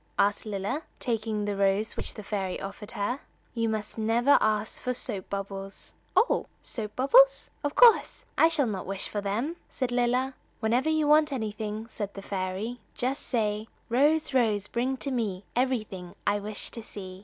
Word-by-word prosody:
asked 205 +2 +2
Lilla, 205 +8 -2 0.2
taking 220 -3 -1
the 205 -1 -1
rose 195 +2 +1
which - - -5
the 210 - -7
fairy 195 -3 -2
offered 200 +1 -7
her. 225 +7 -2 0.3
"You 230 -1 0
must 215 0 -3
never 235 +5 +4
ask 215 0 +1
for 250 0 -1
soap 205 -6 -3
bubbles." 195 0 -6 0.2
"Oh, 480 - +3 0.2
soap 215 -3 -4
bubbles? - - +5
Of 290 0 -1
course, 480 -2 +6
I 325 - +6
shall 320 -4 +2
not 195 -6 -3
wish 195 0 -2
for 205 - -3
them!" 230 +12 -2
said 255 -2 -2
Lilla. 250 +2 +1 0.3
"Whenever 240 +6 +2
you 310 -1 +2
want 300 0 +5
anything," 215 -3 -3
said 205 -3 -5
the 195 - -7
fairy, 195 +5 -3 0.2
"just 260 +3 -1
say: 215 -3 0 0.2
"Rose, 290 +5 +3
Rose, 215 -5 +2
bring 255 +4 -1
to 275 - -2
me 210 -7 -1
Everything 215 -8 -1
I 205 0 +2
wish 205 +1 -5
to 230 - -6
see." 190 -4 -8
220 Hz, 170 wpm, -28 LUFS, 205-255 Hz, 0.3 s, course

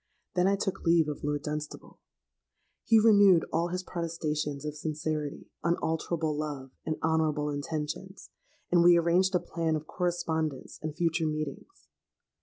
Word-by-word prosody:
Then 180 +1 +3
I 200 - +3
took 195 -1 -3
leave 165 -2 +4
of 150 - -5
Lord 145 0 -1
Dunstable. 150 0 -6 0.8
He 225 -1 +5
renewed 205 -6 +6
all 170 +1 +2
his 180 +1 -3
protestations 155 -5 -3
of 150 0 -4
sincerity, 155 -1 -4
unalterable 160 -1 0
love, 145 -3 -4
and 155 - -2
honourable 155 -2 +1
intentions; 150 +6 -5 0.4
and 175 -1 +5
we 175 0 +7
arranged 180 +3 +3
a - - +4
plan 165 -2 -1
of 155 0 -4
correspondence 160 -4 -2
and 155 0 -4
future 165 -1 +1
meetings. 155 - -5
160 Hz, 140 wpm, -29 LUFS, 150-175 Hz, 0.8 s, we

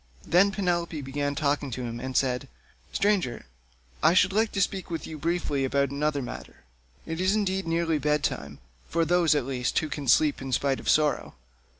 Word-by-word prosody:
Then 180 +4 +5
Penelope 175 -5 -1
began 145 +1 -2
talking 145 -2 0
to 125 +1 -5
him 120 -1 -5
and 130 +1 -3
said: 125 -2 0 0.4
"Stranger, 185 - 0 0.6
I 165 +3 +5
should 190 +1 +4
like 220 +1 +2
to 200 - -1
speak 190 0 -3
with 165 -1 -4
you 155 -1 -7
briefly 160 -4 -1
about 140 +1 +1
another 145 0 -1
matter. 65 - -9 0.4
It 165 +2 -4
is 190 +3 +2
indeed 190 -3 -1
nearly 165 -1 +1
bed 150 0 +1
time—for 65 - -3
those, 170 -2 +3
at 145 - 0
least, 125 -2 -2
who 155 - +1
can 145 -2 -5
sleep 145 +4 +4
in 135 0 -5
spite 135 +2 +1
of - - -4
sorrow. 150 -1 +2
150 Hz, 185 wpm, -27 LUFS, 135-175 Hz, 0.6 s, Then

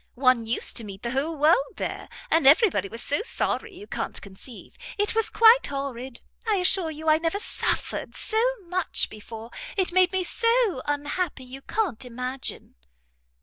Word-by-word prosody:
One 255 -3 +3
used 230 - 0
to 235 - -3
meet 195 -2 -9
the 235 - -2
whole 295 +5 -1
world 350 - +3
there, - - -5 0.2
and 320 -4 +4
every 390 - +7
body 200 -5 -2
was 230 +3 -5
so 290 - +1
sorry 440 -2 -2
you 405 - -10
can't - - -4
conceive. 200 +5 -11 0.2
It 415 0 0
was 450 -1 +1
quite 460 +2 +6
horrid. 265 -3 -5 0.3
I 435 - +3
assure 365 -2 +2
you 315 +1 -7
I 310 0 +5
never 330 +4 -1
suffered - - -1
so 440 0 0 0.2
much 360 0 -1
before; 225 +2 -10 0.3
it 375 -2 +1
made 370 0 +4
me 375 -1 0
so 460 - +1
unhappy 290 +1 -2
you 260 +2 -10
can't 360 - -2
imagine." 250 +2 -5
305 Hz, 170 wpm, -25 LUFS, 255-380 Hz, 0.3 s, every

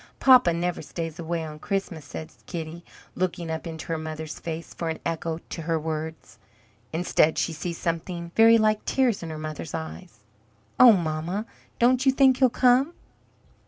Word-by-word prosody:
Papa 255 -8 +7
never 175 +1 -2
stays 165 +1 -6
away 165 0 -2
on 155 -1 -8
Christmas," 195 -5 -3
says 155 +3 -9
Kitty, 170 0 -6 0.3
looking 175 -2 -2
up 160 +1 -4
into 160 -1 -7
her 165 -1 -1
mother's 155 0 -6
face 165 0 -6
for 165 - -3
an 160 - -3
echo 165 -1 -2
to 165 - -8
her 165 0 0
words. 160 0 -5 0.5
Instead 160 -1 +2
she 165 - 0
sees 165 +2 -4
something 170 +1 -3
very 225 +1 +7
like 215 -1 +2
tears 255 -6 +1
in 165 - -6
her 155 - -5
mother's 155 0 -6
eyes. 160 - -8 0.6
"Oh, 245 -3 +10
mamma, 170 +3 -2 0.3
don't 250 +2 +3
you 265 - +5
think 265 -1 +4
he'll 260 -1 +5
come?" 255 +6 +3
170 Hz, 165 wpm, -25 LUFS, 160-210 Hz, 0.6 s, Oh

